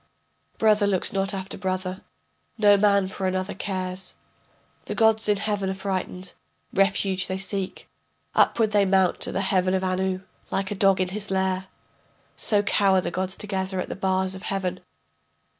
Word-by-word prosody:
Brother 210 -2 +4
looks 190 -3 +2
not 195 0 0
after 195 -1 -5
brother, 185 0 -3 0.6
no 205 -2 +6
man 200 -1 +3
for 190 0 -3
another 185 +1 -2
cares. 185 -1 -4 0.7
The - - -4
gods 220 -1 +3
in 205 - +3
heaven 200 -2 -1
are 190 - -2
frightened, 190 -1 -4 0.4
refuge 195 -1 +2
they 185 - -2
seek, 195 0 -3 0.5
Upward 220 -2 +3
they 205 -1 +4
mount 190 -2 +2
to - - -1
the 195 - -1
heaven 190 -1 +2
of 190 - -1
Anu. 185 0 -1 0.3
Like 195 0 -2
a - - -1
dog 195 -1 +3
in 185 - 0
his 200 +1 -3
lair, 190 0 0 0.7
So 205 -2 +2
cower 195 -2 +3
the - - -3
gods 185 0 -3
together 190 -2 -3
at - - -3
the - - -4
bars 190 -1 0
of 190 - -9
heaven. 185 -2 -2
190 Hz, 165 wpm, -25 LUFS, 185-200 Hz, 0.7 s, no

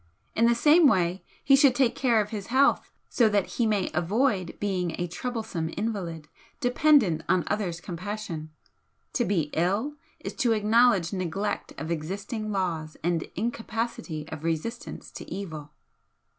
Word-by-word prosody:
In 230 - +3
the 235 - +4
same 305 +6 +6
way 180 -4 +1 0.2
he 275 - +6
should 275 -2 +5
take 250 -2 +3
care 240 -4 +2
of 210 0 -1
his 205 -3 -5
health 265 +3 +3 0.2
so 230 -3 +3
that 205 -2 +2
he 235 - -1
may 205 -4 0
avoid 190 - 0
being 185 -4 -1
a 175 - 0
troublesome 215 -4 -4
invalid, 185 -8 -3 0.3
dependent 245 - +4
on 180 - +3
others' 190 -5 -2
compassion. 180 -3 -5 0.6
To 240 - +1
be 165 -8 0
ill 205 - 0 0.2
is - - -6
to 235 -3 +3
acknowledge 215 -4 +3
neglect 185 +2 -2
of 160 +1 -4
existing 200 +7 -3
laws 165 -6 -2
and 170 -1 +1
incapacity 225 -7 -3
of 160 -1 -7
resistance 165 +9 -4
to - - -10
evil." 160 -7 -6
200 Hz, 145 wpm, -27 LUFS, 170-230 Hz, 0.6 s, same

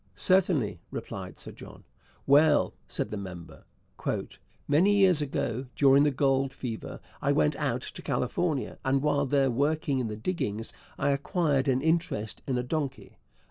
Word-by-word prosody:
'Certainly,' 170 - +2
replied - - -7
Sir - - -6
John. - - -12 0.4
'Well,' 145 +2 +5
said - - -3
the 105 - -3
member, 90 -4 -9 1.0
'many 180 +8 +4
years 185 -6 +5
ago, 130 -3 -2
during 140 0 +6
the - - +4
gold 135 -1 +1
fever, 115 -4 -6 0.2
I - - +2
went 75 -1 +2
out - - -1
to - - -8
California, 155 -7 -1
and 135 +1 +1
while 145 -2 +2
there 135 -1 +2
working 140 +1 0
in 125 - -1
the 105 - -4
diggings 110 - -3 0.2
I 140 - +1
acquired 140 -1 +1
an 130 0 +1
interest 160 - 0
in 130 -2 0
a 125 - -1
donkey. 140 - -4
140 Hz, 150 wpm, -28 LUFS, 125-155 Hz, 1.0 s, during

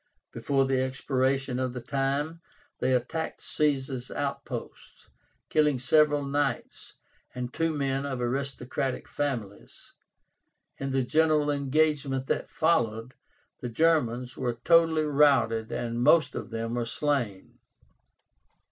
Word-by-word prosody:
Before 135 -1 +1
the 135 -1 +1
expiration 130 0 0
of 130 -1 -1
the 125 - -5
time, 140 +6 -2 0.4
they - - +1
attacked 130 +6 -2
Caesar's 135 -4 -1
outposts, 140 -1 -6 0.4
killing 150 -3 +3
several 145 +3 +3
Knights, 140 -2 -2 0.4
and 125 0 -4
two 165 0 0
men 135 -2 -1
of 130 -3 -3
aristocratic 130 +1 -2
families. 120 -9 -5 0.9
In 135 - -3
the 135 -1 +1
general 155 +2 +2
engagement 140 -1 +1
that - - -2
followed, 120 -7 0 0.5
the 125 - -5
Germans 125 -4 +1
were 120 -3 -2
totally 165 -2 +4
routed 135 -7 +3
and 120 0 -3
most 155 +3 +4
of - - -6
them 115 0 -3
were 120 -1 -1
slain. 120 -6 -2
135 Hz, 115 wpm, -28 LUFS, 125-150 Hz, 0.9 s, totally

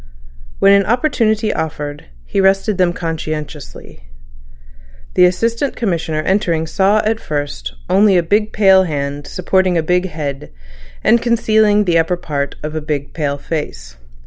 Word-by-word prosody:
When 200 - +5
an 200 -1 +3
opportunity 225 -4 +1
offered, 150 -2 -5 0.2
he 195 - 0
rested 195 +1 +2
them 180 -1 +3
conscientiously. 155 - -6 1.1
The 180 - +5
Assistant 230 +9 0
Commissioner 165 -8 -2
entering 170 -4 0
saw 200 +5 +2
at 220 +1 0
first 145 - -5
only 195 0 +4
a 175 - +2
big 210 +5 +1
pale 190 -2 +4
hand 145 -2 -4
supporting 185 0 0
a 165 - +1
big 180 +3 +1
head, 145 -4 -5 0.5
and 235 +1 +4
concealing 220 -3 +3
the 170 -2 +3
upper 170 +2 0
part 140 -5 -4
of 150 0 -4
a 155 - -3
big 145 -2 -4
pale 145 -3 -2
face. 65 - -6
175 Hz, 145 wpm, -17 LUFS, 150-205 Hz, 1.1 s, When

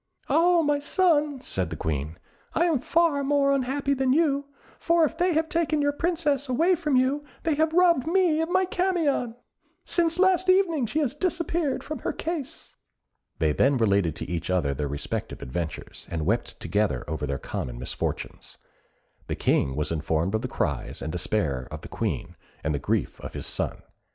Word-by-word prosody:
"Ah, 340 0 +4
my 290 -1 +2
son," 295 -3 +2
said 95 - -2
the 80 - -5
Queen, 75 +1 -3 0.4
"I 340 - +3
am 325 -6 +2
far 315 +1 +2
more 280 0 +3
unhappy 275 +1 0
than 265 -1 +2
you, 285 -2 +2 0.3
for 335 0 +3
if 310 - +1
they 355 -2 +1
have 320 0 +2
taken 320 -2 0
your 285 0 +2
Princess 295 -4 0
away 330 +9 +3
from 305 -5 0
you, 265 +3 +2 0.2
they 320 - +2
have 315 +2 +2
robbed 340 -5 +4
me 340 -3 +3
of 325 - -1
my 375 +1 +3
Camion. 340 -10 0 0.5
Since 335 -1 +1
last 375 0 +3
evening, 340 -9 +3
she 295 - -3
has 270 -4 0
disappeared 335 -2 -1
from 310 - -5
her - - -2
case!" 325 -5 -5 0.6
They 80 -2 +2
then 135 - +3
related 100 -8 +2
to - - -6
each 85 -1 -3
other 85 -7 +1
their 75 +1 -2
respective 70 +1 -4
adventures, 80 +5 -5
and 80 -2 -3
wept 115 +6 -1
together 100 - 0
over 75 -1 -3
their 70 0 -2
common 60 -3 -5
misfortunes. 60 - -5 0.7
The - - -2
King 65 - +1
was 75 +2 -1
informed 80 +3 0
of 110 - +1
the - - -3
cries - - -3
and 80 - -3
despair 80 -7 -1
of - - -7
the - - -9
Queen, - - -3 0.3
and 75 - 0
the 70 - -1
grief - - -1
of - - -7
his - - -5
son. - - -2
280 Hz, 180 wpm, -26 LUFS, -, 0.7 s, Ah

